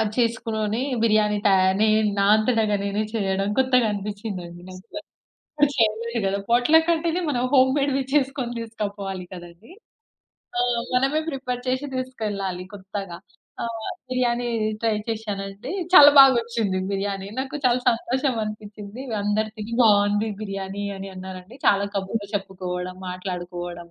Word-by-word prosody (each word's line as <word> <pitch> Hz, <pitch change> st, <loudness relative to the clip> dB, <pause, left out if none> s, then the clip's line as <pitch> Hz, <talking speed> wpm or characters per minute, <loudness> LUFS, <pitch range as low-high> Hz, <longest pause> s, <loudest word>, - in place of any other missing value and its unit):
చేసుకోని 225 Hz, -2 st, 0 dB, 0.2 s
బిర్యానీ 215 Hz, -2 st, +3 dB
తా 205 Hz, -, +6 dB, 0.3 s
నేన్ 215 Hz, 0 st, +3 dB
నా 200 Hz, -, +3 dB
అంతటగా 220 Hz, -1 st, +2 dB
నేనే 200 Hz, +1 st, -1 dB
చేయడం 195 Hz, -2 st, 0 dB
కొత్తగా 255 Hz, -2 st, +4 dB
అనిపించిందంది 200 Hz, -4 st, -6 dB
నాకు. 185 Hz, +3 st, -12 dB, 0.9 s
చేయలేదు 230 Hz, 0 st, +1 dB
కదా! 195 Hz, +1 st, 0 dB
పాట్‌లకంటేనే 320 Hz, +7 st, +3 dB
మనం 245 Hz, -4 st, 0 dB
హోమ్ 260 Hz, -1 st, +5 dB
మేడ్ 280 Hz, -1 st, +1 dB, 0.2 s
చేసుకొని 265 Hz, -4 st, 0 dB
తీసుకుపోవాలి 200 Hz, -4 st, -5 dB
కదండీ. 175 Hz, -, -11 dB, 0.9 s
ఆ! -, -, +3 dB, 0.3 s
మనమే 270 Hz, +5 st, +2 dB
ప్రిపేర్ 255 Hz, -4 st, -3 dB
చేసి 260 Hz, +3 st, 0 dB
తీసుకెళ్లాలి 205 Hz, -8 st, -3 dB
కొత్తగా. 195 Hz, -2 st, -6 dB, 0.5 s
ఆహ్, 225 Hz, -1 st, -4 dB, 0.2 s
బిర్యానీ 245 Hz, -1 st, 0 dB, 0.3 s
ట్రై 225 Hz, -1 st, +2 dB
చేశానండి. 210 Hz, -, -4 dB, 0.2 s
చాలా 290 Hz, -4 st, +10 dB
బాగొచ్చింది 235 Hz, -7 st, +4 dB
బిర్యానీ. 195 Hz, 0 st, -3 dB
నాకు 265 Hz, +2 st, -4 dB
చాలా 250 Hz, 0 st, +3 dB
సంతోషం 255 Hz, +2 st, -1 dB
అనిపించింది. 210 Hz, +2 st, -8 dB, 0.2 s
అందరు 210 Hz, +1 st, 0 dB
తిని 215 Hz, +2 st, -5 dB
బాగుంది 205 Hz, 0 st, +4 dB
బిర్యానీ 195 Hz, -1 st, -4 dB
అని 195 Hz, 0 st, -7 dB
అన్నారండి. 185 Hz, +4 st, -9 dB
చాలా 200 Hz, 0 st, +4 dB
కబుర్లు 200 Hz, +2 st, -3 dB
చెప్పుకోవడం, 185 Hz, -2 st, -5 dB
మాట్లాడుకోవడం 175 Hz, -2 st, -6 dB
215 Hz, 120 wpm, -24 LUFS, 195-245 Hz, 0.9 s, చాలా